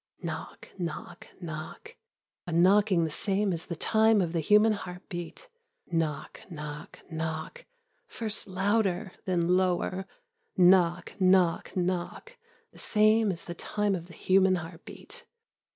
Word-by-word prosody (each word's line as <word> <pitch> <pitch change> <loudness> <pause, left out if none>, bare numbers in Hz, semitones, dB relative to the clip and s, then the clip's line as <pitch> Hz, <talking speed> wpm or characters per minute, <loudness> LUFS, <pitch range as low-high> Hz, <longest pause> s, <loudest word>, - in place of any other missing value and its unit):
Knock, - - -6
knock, 170 0 -6
knock, 170 - -8 0.5
a - - -4
knocking 185 +1 +4
the 160 - -2
same 200 +3 +1
as 165 0 -5
the 170 - -4
time 220 +4 +3
of 175 -3 -1
the 170 - +1
human 210 +6 +4
heartbeat. 180 - -7 0.4
Knock, 160 -3 -2
knock, 150 -3 -8
knock, 160 - -5 0.4
first 220 -3 -4
louder, 195 0 0
then 175 -3 +1
lower. 185 +1 +1 0.5
Knock, 180 -1 +4
knock, 185 -2 +3
knock, 180 - -3 0.4
the - - -17
same 215 0 +3
as 170 -2 -7
the 175 - -5
time 205 +3 -1
of 175 -2 -4
the 170 - -14
human 190 +1 +3
heartbeat. 165 -1 -9
185 Hz, 125 wpm, -28 LUFS, 170-205 Hz, 0.5 s, knocking